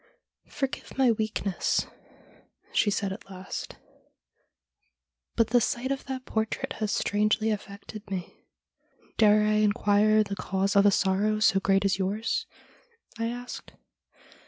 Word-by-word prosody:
' - - -64
Forgive 270 -1 -5
my 260 -3 +5
weakness,' 215 -4 -1 0.9
she 210 - +3
said 200 -1 -1
at 195 - -12
last, 185 0 -7 0.8
' - - -53
but 230 -2 +3
the 245 +1 +4
sight 245 +4 -1
of 275 - -3
that 260 -1 -5
portrait 220 0 -2
has 215 -2 -1
strangely 215 +2 +1
affected 205 +1 -7
me.' 185 -3 -6 0.3
' - - -34
Dare 210 -1 +6
I 215 0 +2
inquire 215 0 +3
the 200 -1 -5
cause 195 +1 -1
of 200 0 +6
a - - +8
sorrow 200 +3 +1
so 215 -3 +4
great 195 +1 +2
as 195 -1 +1
yours? 205 +4 -1 0.4
' 465 - -24
I 230 - 0
asked. 245 +1 -7
215 Hz, 145 wpm, -27 LUFS, 200-230 Hz, 0.9 s, a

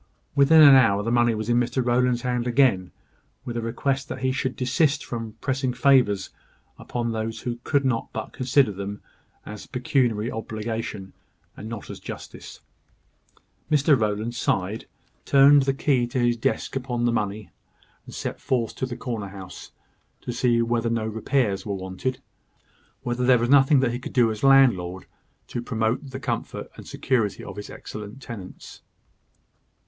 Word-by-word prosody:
Within 150 +3 +6
an 140 -2 +10
hour 115 -6 +5
the 115 - -1
money 120 -1 +3
was 110 0 -4
in 120 0 +3
Mr 125 +1 -1
Rowland's 125 0 +2
hands 125 -1 -1
again, 120 -8 +2 0.5
with 120 - -5
a 120 - -1
request 135 +5 -2
that 130 - -6
he 130 0 +1
would 130 - -2
desist 135 +3 +1
from 115 -2 -5
pressing 130 -2 -1
favours 125 -7 +3 0.5
upon 120 -1 -3
those 110 0 -4
who 120 -1 -4
could 140 -2 +1
not 115 -3 -1
but 110 - -6
consider 130 -2 +2
them 100 +1 -6 0.4
as 105 -1 -9
pecuniary 125 -4 0
obligation, 110 -3 -5 0.4
and 110 - -8
not 115 -3 -7
as - - -9
justice. - - -9 1.1
Mr 150 -1 +4
Rowland 110 0 -1
sighed, 105 -2 -1 0.4
turned 140 +1 +6
the 135 0 +1
key 135 -2 +1
of 120 - -12
his 120 -2 +2
desk 130 +4 -2
upon 125 -2 -2
the 120 - +2
money, 105 -4 -3 0.6
and - - -9
set - - -4
forth 120 -4 -1
to 130 - -2
the 120 -1 -6
corner 115 -4 -4
house, 95 -1 -10 0.5
to - - -5
see 120 -1 +2
whether 115 0 0
no 115 -1 -1
repairs 110 -2 0
were 100 -2 -3
wanted 95 +7 -4 0.8
whether 120 +1 -2
there 125 0 +5
was 120 +1 -1
nothing 140 0 +6
that 130 -3 +1
he 120 - -4
could - - -8
do 120 -3 +4
as 110 - -6
landlord 115 -10 +4 0.4
to 120 - -5
promote 115 +3 -2
the 130 +1 -6
comfort 120 -4 -4
and - - -12
security 110 -7 -1
of - - -8
his 105 - -7
excellent 105 +4 -9
tenants. 110 -8 -10
120 Hz, 165 wpm, -24 LUFS, 110-130 Hz, 1.1 s, an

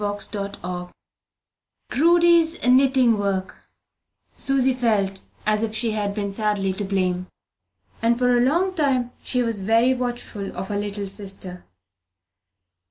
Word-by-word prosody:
CHAPTER 205 0 -4
III 180 0 -4 1.0
PRUDY'S 335 +2 +3
KNITTING 255 -3 +4
WORK 195 -2 -3 0.7
Susy 265 -1 +2
felt 205 -6 0 0.2
as 215 0 +2
if 220 -1 -2
she 225 +1 +3
had 205 -2 -2
been 200 -2 -2
sadly 200 -2 0
to 205 - -4
blame, 185 -2 -1 0.7
and 235 +1 +2
for 250 0 +3
a 240 - +3
long 340 +9 +2
time 265 -7 0 0.2
was 230 -5 +1
very 230 +5 +3
watchful 240 -6 -5
of 190 +1 -5
her 205 - -2
little 205 0 -4
sister. 195 -2 -7
215 Hz, 125 wpm, -23 LUFS, 200-250 Hz, 1.0 s, KNITTING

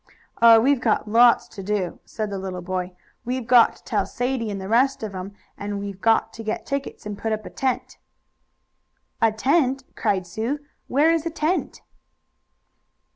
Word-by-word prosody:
"Oh, 230 -1 +9
we've 265 +2 +2
got 220 -2 +1
lots 235 +2 +5
to 200 - -9
do," 195 -2 -2
said 215 -2 -4
the 195 - -3
little 185 -2 -5
boy. 185 0 -3 0.3
"We've 250 0 -3
got 240 0 +5
to - - -21
tell - - -1
Sadie 245 -2 -2
and 200 -1 -4
the 190 - -6
rest 250 +4 +2
of 210 -2 -4
'em, 190 +2 -7 0.2
and 205 0 -4
we've 200 -1 -7
got 225 0 +2
to 225 - -8
get 215 0 -3
tickets, 275 -4 -4
and 210 -1 -4
put 220 +2 -3
up 215 -1 -2
a - - -8
tent." 260 -2 -2 1.2
"A 225 -1 +4
tent!" 270 +3 +1
cried 195 -4 0
Sue. 220 +11 -3 0.3
"Where 300 +5 +3
is 330 0 -1
a - - 0
tent?" 330 +2 -2
225 Hz, 180 wpm, -23 LUFS, 200-260 Hz, 1.2 s, Oh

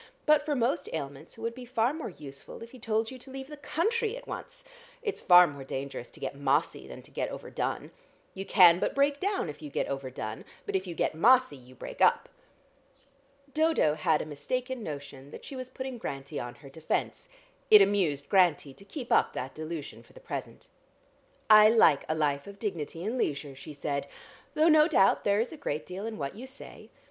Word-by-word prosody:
But 305 -1 +5
for 295 -1 -1
most 260 +6 0
ailments 145 +2 -6
it - - -11
would 230 0 -2
be 250 +1 -9
far 245 +1 0
more 315 -5 -5
useful 145 +3 -10
if 230 - -12
he 255 - -13
told 220 +1 -1
you 260 - -9
to 255 - -14
leave 265 0 -7
the 300 - -7
country 435 - -1
at - - -12
once. - - -7 0.4
It's 420 -4 -3
far 180 -1 +8
more 145 -4 -7
dangerous 135 -2 -5
to - - -15
get - - -4
mossy 140 +3 0
than - - -10
to - - -17
get - - -2
over - - -8
done. - - -3 0.4
You 195 - -5
can 180 -3 +6
but - - -1
break 280 +1 +2
down 395 - -1
if 150 0 -8
you 150 - -7
get - - -1
over 135 -1 -4
done, 110 -3 -6 0.2
but - - -3
if 190 0 -1
you 170 - -5
get - - 0
mossy 240 - +4
you 130 -1 -16
break - - -8
up." - - +4 1.2
Dodo 315 - +3
had 160 -1 +1
a - - -9
mistaken 250 - -4
notion 140 -5 -7
that - - -11
she 275 - -8
was 255 -1 -6
putting 260 -1 -6
Grantie 140 -4 -5
on 120 +1 -6
her 140 +2 -14
defence. 160 +2 -3 0.4
It 210 -2 +10
amused 180 -9 0
Grantie 175 -8 +3
to 195 - -15
keep 245 +3 -8
up - - +4
that 130 +1 -5
delusion 155 -1 -6
for - - -22
the - - -13
present. - - -7 0.8
"I 215 0 +9
like 165 -11 +5
a 155 - +1
life 145 -1 0
of 200 0 -10
dignity 170 -6 -4
and 230 +6 -2
leisure," 145 -5 -2
she 145 +3 -10
said, 140 0 -3 0.5
"though 310 +2 +4
no 310 -1 +6
doubt 195 - +3
there 205 0 +3
is 235 - -3
a - - -9
great 155 - -3
deal 190 +4 -6
in 225 - -5
what 140 -2 -4
you 250 +5 -8
say. 265 +1 -12
195 Hz, 215 wpm, -29 LUFS, -, 1.2 s, It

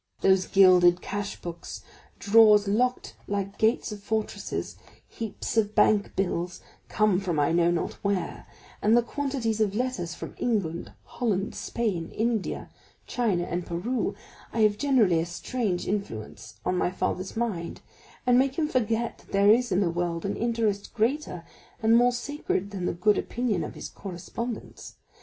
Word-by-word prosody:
Those 190 -1 +4
gilded 180 -2 +6
cashbooks, 195 -4 -5 0.3
drawers 210 -1 +6
locked 250 +5 0
like 200 -1 -3
gates 225 +1 +2
of 210 -1 -7
fortresses, 220 +1 -3 0.3
heaps 225 0 -5
of 215 -1 +2
bank 210 -2 +3
bills, 180 -2 -1 0.3
come 210 -4 +2
from 175 -6 -1
I 145 - +2
know 170 0 +3
not 175 -1 -1
where, 200 -4 -2 0.3
and 220 +3 +4
the 240 - +4
quantities 250 -5 -2
of 205 -2 +1
letters 215 -9 -2
from - - -7
England, 195 -9 -1
Holland, 210 -5 -2
Spain, 195 -9 -2
India, 225 -2 -2 0.3
China, 210 -8 0
and 175 +1 -3
Peru, 190 +10 -2 0.4
have 215 -2 +3
generally 230 - +3
a 165 - 0
strange 185 +1 -2
influence 110 - -5
on 180 0 +1
a 175 - +1
father's 185 +2 -3
mind, 200 -8 -3 0.4
and 250 0 +5
make 270 0 +1
him 315 -2 +1
forget 235 -3 -1
that - - -20
there 200 +1 +5
is 240 +2 +3
in 185 - +3
the 175 -4 +1
world 170 0 -2
an 195 - -1
interest 225 -3 -1
greater 230 - -1 0.4
and 225 +1 +4
more 245 +1 +5
sacred 245 -6 -3
than 185 -3 -3
the - - 0
good 195 +4 +2
opinion 240 -3 -1
of - - -7
his - - -6
correspondents. 200 +5 -7
205 Hz, 150 wpm, -27 LUFS, 180-230 Hz, 0.4 s, gilded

